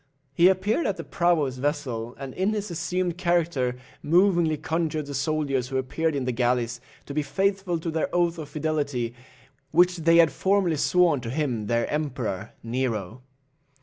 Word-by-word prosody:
He 170 Hz, +5 st, +5 dB
appeared 205 Hz, -, +2 dB
at 195 Hz, -, -1 dB
the -, -, -5 dB
prow 175 Hz, -2 st, +2 dB
of -, -, +2 dB
his 130 Hz, -1 st, -5 dB
vessel, 125 Hz, -5 st, -2 dB
and 135 Hz, -2 st, -7 dB
in 190 Hz, +4 st, 0 dB
his 210 Hz, -2 st, -3 dB
assumed 175 Hz, +1 st, -2 dB
character 170 Hz, -8 st, +1 dB, 0.2 s
movingly 170 Hz, -1 st, +3 dB
conjured 155 Hz, 0 st, -2 dB
the 145 Hz, -, -7 dB
soldiers 140 Hz, -3 st, 0 dB
who 135 Hz, 0 st, -2 dB
appeared 155 Hz, +4 st, -1 dB
in 135 Hz, -2 st, -1 dB
the 125 Hz, -, 0 dB
galleys 120 Hz, 0 st, 0 dB, 0.2 s
to 140 Hz, -, -7 dB
be 150 Hz, -, +1 dB
faithful 195 Hz, +3 st, 0 dB
to 165 Hz, 0 st, -4 dB
their 160 Hz, 0 st, -1 dB
oath 175 Hz, -1 st, +1 dB
of 150 Hz, -2 st, -7 dB
fidelity, 145 Hz, -6 st, -2 dB, 0.6 s
which 180 Hz, +2 st, +4 dB
they 165 Hz, 0 st, +4 dB
had 165 Hz, -2 st, +6 dB
formerly 190 Hz, -4 st, +1 dB
sworn 170 Hz, -2 st, +3 dB
to 115 Hz, -, -5 dB
him 125 Hz, -6 st, -2 dB
their 115 Hz, +1 st, +1 dB
Emperor, 130 Hz, -8 st, -3 dB
Nero. 115 Hz, -2 st, -2 dB
155 Hz, 175 wpm, -25 LUFS, 130-175 Hz, 0.6 s, had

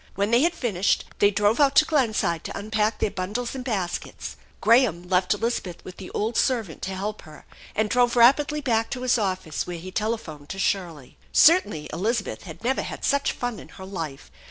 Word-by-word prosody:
When 200 Hz, +3 st, 0 dB
they 235 Hz, +2 st, +5 dB
had 340 Hz, +2 st, +2 dB
finished 205 Hz, -, 0 dB
they 205 Hz, -, +6 dB
drove 205 Hz, +3 st, +2 dB
out 280 Hz, -1 st, +4 dB
to 310 Hz, -, +7 dB
Glenside 220 Hz, -, +1 dB
to -, -, -5 dB
unpack 215 Hz, +1 st, 0 dB
their -, -, 0 dB
bundles 210 Hz, +6 st, -3 dB
and 260 Hz, -2 st, -5 dB
baskets. 195 Hz, -8 st, -4 dB, 0.2 s
Graham 215 Hz, -7 st, +3 dB
left 180 Hz, +1 st, +2 dB
Elizabeth 205 Hz, -5 st, -3 dB
with 185 Hz, -, -10 dB
the 190 Hz, -, -8 dB
old 220 Hz, +3 st, -2 dB
servant 225 Hz, -12 st, 0 dB
to 190 Hz, 0 st, -4 dB
help 205 Hz, +3 st, -4 dB
her, 155 Hz, -2 st, -14 dB, 0.3 s
and 215 Hz, 0 st, +1 dB
drove 245 Hz, +2 st, +2 dB
rapidly 285 Hz, +5 st, +4 dB
back 225 Hz, -5 st, +1 dB
to 250 Hz, -, -4 dB
his 250 Hz, -1 st, +2 dB
office, 185 Hz, -6 st, -2 dB
where 175 Hz, -1 st, -5 dB
he 185 Hz, +3 st, -8 dB
telephoned 200 Hz, -10 st, -3 dB
to 195 Hz, -, -5 dB
Shirley. 175 Hz, -8 st, -2 dB
Certainly 320 Hz, -, +4 dB
Elizabeth 215 Hz, +3 st, -2 dB
had 160 Hz, +2 st, -10 dB
never 260 Hz, +3 st, +1 dB
had -, -, -5 dB
such 280 Hz, 0 st, +2 dB
fun 245 Hz, -3 st, -4 dB
in -, -, -12 dB
her 190 Hz, -, -11 dB
life. 165 Hz, -8 st, -6 dB
210 Hz, 195 wpm, -25 LUFS, 185-245 Hz, 0.3 s, to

